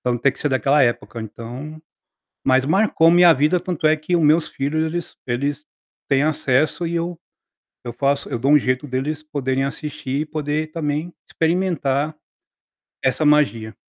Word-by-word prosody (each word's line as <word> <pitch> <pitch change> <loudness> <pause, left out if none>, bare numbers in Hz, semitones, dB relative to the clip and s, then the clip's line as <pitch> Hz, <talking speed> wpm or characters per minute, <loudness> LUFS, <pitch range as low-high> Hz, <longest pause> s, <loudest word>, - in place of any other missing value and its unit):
então 120 -1 -1
tem 140 +3 +3
que 140 - -14
ser 150 - -1
daquela 135 +2 +3
época, 120 -1 -1
então. 125 +8 -8 0.7
Mas 130 0 +4
marcou 165 -1 +3
minha 175 0 +7
vida, 155 +5 +2
tanto 175 -3 -5
é 155 0 +4
que 155 +4 -3
o 170 - +3
meus 155 +2 +3
filhos 150 +4 -1
eles 170 +1 -4
eles 140 +4 -2 0.4
têm 140 0 +3
acesso 155 +2 +1
e 170 - -3
eu 170 0 -3 0.7
eu 120 - -5
faço 140 +3 0
eu - - -3
dou 135 +5 +1
um 150 - +8
jeito 130 +1 -1
deles 145 +4 -3
poderem 135 -3 -2
assistir 140 -1 -4
e - - -6
poder, 155 0 -3
também, 155 +1 -3 0.2
experimentar 160 -4 0 0.9
essa 130 +4 +1
magia. 115 -7 +2
150 Hz, 165 wpm, -21 LUFS, 135-160 Hz, 0.9 s, um